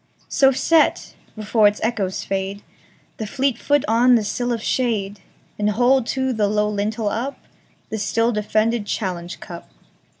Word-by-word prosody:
So 270 -1 +4
set, 315 +4 +2 0.2
before 215 0 +3
its 205 +1 0
echoes 210 -5 -1
fade, 195 +1 -3 0.5
The 220 - -4
fleet 265 +1 -1
foot 290 -1 +1
on 240 +3 +5
the 225 - +2
sill 245 +4 -2
of 230 -2 -2
shade, 210 -5 -1 0.4
And 210 0 +2
hold 245 +3 +2
to 265 -1 -1
the 215 -3 +1
low 210 0 +1
lintel 210 +1 -1
upThe 230 -2 -7
still 230 +3 +1
defended 215 0 0
challenge 180 -5 -4
cup. 170 -1 -10
220 Hz, 145 wpm, -21 LUFS, 205-245 Hz, 0.5 s, on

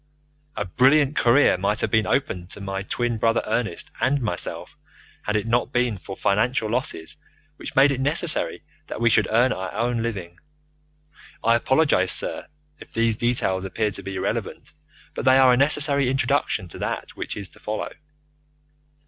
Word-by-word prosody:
A 105 - -2
brilliant 135 +9 +3
career 120 -5 +4
might 105 +3 0
have - - -1
been 110 -1 +2
open 90 -11 -1
to 95 - -10
my 95 -1 -4
twin 120 +3 -2
brother 115 +1 +2
Ernest 110 -8 -3
and 140 +2 +2
myself 105 -8 -4 0.5
had 105 - -1
it 105 0 0
not 120 +2 0
been 120 -6 0
for 95 +1 -9
financial 110 +2 +1
losses 115 -10 -3 0.4
which - - -8
made 140 +2 +6
it 135 -1 -2
necessary 155 +4 +1 0.2
that - - -6
we 120 0 +3
should 110 -2 +3
earn 120 +4 +3
our 95 0 -5
own 120 +1 -1
living. 95 -7 -5 1.0
I 115 - +4
apologize, 125 -5 +2
sir, - - +1 0.3
if - - -14
these 115 -1 +1
details 105 -5 0
appear 105 +3 -1
to 100 - -3
be 95 0 -6
irrelevant, 95 - -4 0.4
but - - -5
they 130 0 +5
are 130 -1 +6
a - - +5
necessary 140 -1 +3
introduction 135 -7 0
to - - -10
that - - -4
which - - -5
is 100 -2 -6
to - - -18
follow. 110 0 -4
115 Hz, 170 wpm, -23 LUFS, 100-130 Hz, 1.0 s, made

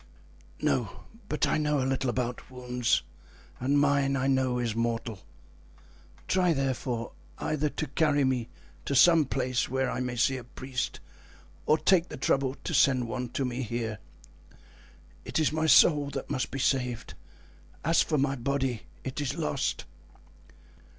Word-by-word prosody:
"No, - - -1 0.3
but 150 - +1
I - - +1
know 150 -1 +1
a 130 - 0
little 135 -1 0
about 125 0 -3
wounds, 125 -2 0 0.6
and 135 +3 +1
mine, 140 -1 +2
I 130 -1 0
know, 130 -2 +2
is 120 -3 -1
mortal. 115 -2 -2 1.1
Try, 180 -2 +3
therefore, 130 -4 -2 0.3
either 155 -1 -1
to 155 - -3
carry 145 0 +2
me 125 -3 0 0.4
to 140 - -1
some 165 +2 +6
place 130 -1 -1
where 130 0 0
I - - -3
may 125 -1 -2
see 130 +2 +2
a 125 - -7
priest 125 +1 -4 0.7
or 155 - +5
take 180 0 +3
the - - -7
trouble 135 0 +1
to - - -3
send 130 -3 +3
one 125 +1 -4
to 135 - -1
me 125 +1 -3
here. 115 -2 -3 1.2
It - - -3
is 155 -2 +2
my 160 +1 0
soul 145 0 +6
that 135 -2 -5
must 130 - -1
be - - -5
saved; 125 -3 -1 0.7
as 165 0 +4
for 155 - 0
my 135 0 +1
body, 135 -2 -2 0.2
it 130 +2 -4
is 140 - -2
lost." 75 - -1
130 Hz, 155 wpm, -28 LUFS, 125-145 Hz, 1.2 s, some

